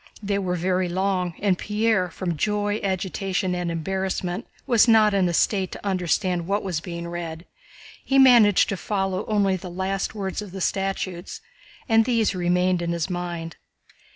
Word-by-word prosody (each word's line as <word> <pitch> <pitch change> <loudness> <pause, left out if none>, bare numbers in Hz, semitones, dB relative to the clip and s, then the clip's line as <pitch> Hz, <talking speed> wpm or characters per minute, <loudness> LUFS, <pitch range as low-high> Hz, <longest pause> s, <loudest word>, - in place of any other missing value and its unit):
They 200 0 0
were 180 -2 -1
very 180 +1 0
long, 185 -1 -1
and 195 -3 +1
Pierre, 210 -3 +1
from 175 -1 -3
joy, 205 +5 0
agitation, 190 0 -1
and 175 -1 -2
embarrassment, 185 +3 -3 0.2
was 235 -3 +4
not 220 -2 +5
in 190 -3 +2
a - - -2
state 190 -1 +1
to - - -10
understand 180 -2 0
what 200 +2 0
was 180 -5 -2
being 170 0 -6
read. 170 -1 -6 0.6
He 270 - +1
managed 240 -7 +6
to 195 - -2
follow 195 0 -2
only 200 -3 +2
the 180 0 -8
last 190 +3 -3
words 195 -1 -3
of 200 -3 -9
the 195 - -6
statutes 190 - -2 0.5
and 225 -2 +4
these 230 -5 +1
remained 180 0 +1
in 170 0 -1
his 170 +2 -2
mind. 175 -2 -5
190 Hz, 165 wpm, -24 LUFS, 175-205 Hz, 0.6 s, managed